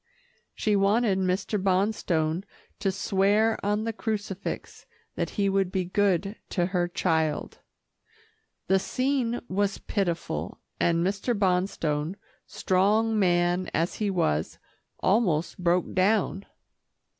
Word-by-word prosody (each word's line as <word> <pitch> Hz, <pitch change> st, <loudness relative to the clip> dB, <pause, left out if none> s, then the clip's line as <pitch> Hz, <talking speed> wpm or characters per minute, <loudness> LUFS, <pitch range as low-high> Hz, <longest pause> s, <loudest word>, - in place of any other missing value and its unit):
She 210 Hz, -1 st, +1 dB
wanted 200 Hz, 0 st, +3 dB
Mr. 190 Hz, +2 st, 0 dB
Bonstone 185 Hz, -4 st, +1 dB, 0.4 s
to 195 Hz, -, +1 dB
swear 200 Hz, +3 st, +1 dB
on 210 Hz, +1 st, 0 dB
the 225 Hz, 0 st, -2 dB
crucifix 205 Hz, -3 st, -4 dB, 0.3 s
that -, -, -2 dB
he 200 Hz, -1 st, +2 dB
would 195 Hz, -1 st, +1 dB
be 185 Hz, -2 st, -1 dB
good 195 Hz, +1 st, +1 dB
to 175 Hz, -3 st, 0 dB
her 180 Hz, -1 st, 0 dB
child. 160 Hz, -3 st, -1 dB, 1.1 s
The 190 Hz, +1 st, +3 dB
scene 255 Hz, +1 st, -1 dB
was 200 Hz, +1 st, 0 dB
pitiful, 175 Hz, -5 st, -3 dB, 0.2 s
and 170 Hz, 0 st, +2 dB
Mr. 205 Hz, +4 st, -1 dB
Bonstone, 180 Hz, -4 st, 0 dB, 0.3 s
strong 210 Hz, +4 st, +2 dB
man 175 Hz, -1 st, +2 dB
as 165 Hz, +2 st, 0 dB
he 210 Hz, -, +1 dB
was, 80 Hz, -, 0 dB, 0.5 s
almost 185 Hz, -7 st, +1 dB
broke 175 Hz, 0 st, +1 dB
down. 195 Hz, 0 st, +1 dB
195 Hz, 110 wpm, -27 LUFS, 175-205 Hz, 1.1 s, wanted